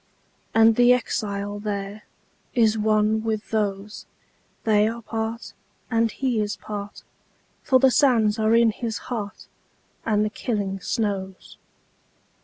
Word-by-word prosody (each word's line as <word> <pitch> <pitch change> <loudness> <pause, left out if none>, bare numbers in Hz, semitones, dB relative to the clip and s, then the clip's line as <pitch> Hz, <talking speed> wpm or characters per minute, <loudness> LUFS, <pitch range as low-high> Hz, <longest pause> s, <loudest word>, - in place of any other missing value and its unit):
And 225 0 +5
the 245 0 +6
exile 205 -4 -2
thereIs 210 +2 -3
one 215 0 +2
with 220 -1 -3
those; 205 -1 -2 0.6
They 210 -1 +3
are 230 +1 -5
part, 225 +1 -4 0.4
and 230 0 +2
he 250 -1 -1
is 210 0 -2
part, 205 -1 -7 0.6
For 260 - +4
the 265 0 +4
sands 230 -6 +3
are 220 +1 +3
in 230 -1 +5
his 225 0 -4 0.2
heart, 210 -3 -5 0.6
And 210 -1 +1
the 210 - -2
killing 200 -4 -3
snows. 195 -2 -3
215 Hz, 120 wpm, -24 LUFS, 205-230 Hz, 0.6 s, the